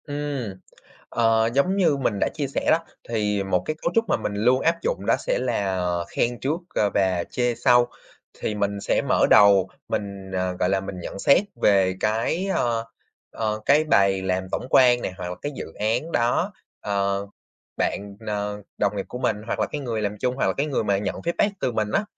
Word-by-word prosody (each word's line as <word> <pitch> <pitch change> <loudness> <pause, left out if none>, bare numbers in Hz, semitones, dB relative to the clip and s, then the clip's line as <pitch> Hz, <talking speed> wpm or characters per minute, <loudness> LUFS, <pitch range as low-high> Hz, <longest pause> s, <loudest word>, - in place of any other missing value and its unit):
Ừm, 145 -7 -3 0.6
ờ, 115 -1 +2
giống 160 +8 +2
như 170 -7 +3
mình 120 -7 -1
đã - - +2
chia 145 -3 -2
sẻ 135 - -3
đó, 160 - +5 0.3
thì 105 -3 0
một 90 -2 0
cái 155 - -2
cấu 170 - 0
trúc 230 - +3
mà - - +3
mình 100 - -4
luôn 125 +5 +3
áp 165 +3 +2
dụng 100 - -2
đó - - +4
sẽ - - -1
là, 100 -7 0
ờ, 90 -1 -1
khen 120 0 -1
trước, 150 +6 -1
ờ, 105 - +2
và 95 -3 +1
chê 120 -1 0
sau. 120 +1 +4 0.5
Thì 105 - -2
mình 100 -1 -1
sẽ 100 - +1
mở - - +4
đầu, 100 -2 +6 0.2
mình, 100 -2 -4
ờ, 95 0 -1
gọi 90 - +2
là, 95 0 +1
mình 95 -1 -7
nhận 95 - -7
xét 140 - +5 0.2
về 95 -2 +4
cái, 115 - 0
ờ, 115 -1 0 0.5
ờ, 110 -1 -2
cái 150 +2 +5
bài 100 -9 +3
làm 95 0 -1
tổng - - -2
quan 125 -2 +5
nè, - - -3
hoặc 90 - -4
là 90 - -4
cái 145 - -3
dự - - -4
án 115 +10 -1
đó, 125 - +1 0.3
ờ, 100 0 -1 0.5
bạn 100 0 -2
n - - -12 0.5
đồng 105 0 +1
nghiệp 100 - -3
của 125 - -6
mình, 110 - 0
hoặc - - -2
là - - +2
cái 150 - -5
người 115 -5 -2
làm 105 0 -2
chung, 125 +3 0
hoặc - - +1
là - - +2
cái 140 - 0
người 140 -6 -1
mà 100 -1 +1
nhận 100 - -2
feedback 170 +4 0
từ 125 - 0
mình 110 -2 -1
á. 210 - +2
110 Hz, 215 wpm, -24 LUFS, 100-130 Hz, 0.6 s, đầu